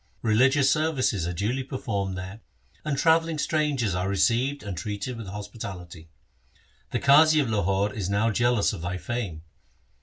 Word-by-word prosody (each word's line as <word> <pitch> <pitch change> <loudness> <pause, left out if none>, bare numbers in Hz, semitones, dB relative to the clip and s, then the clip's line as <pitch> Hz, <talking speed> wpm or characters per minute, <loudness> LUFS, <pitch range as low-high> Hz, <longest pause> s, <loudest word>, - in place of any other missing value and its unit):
Religious 130 +5 +4
services 135 - 0
are 90 - -3
duly 105 +10 -1
per 130 0 -6
formed 100 -6 -3
there, 95 +4 -7 0.4
and 150 -2 -2
travelling 165 +1 +2
strangers 145 - 0
are 90 +2 -1
received 115 +9 +1
and 100 -3 -5
treated 105 +6 -4
with 115 -3 -8
hospitality. 95 -5 -8 0.8
The - - -2
Qazi 155 +3 +6
of 130 -6 0
Lahore 100 0 0
is 100 -4 -3
now 105 +3 +1
jealous 120 -1 +2
of - - -7
thy 90 +2 -3
fame. 100 -8 -5
110 Hz, 155 wpm, -26 LUFS, 95-135 Hz, 0.8 s, Qazi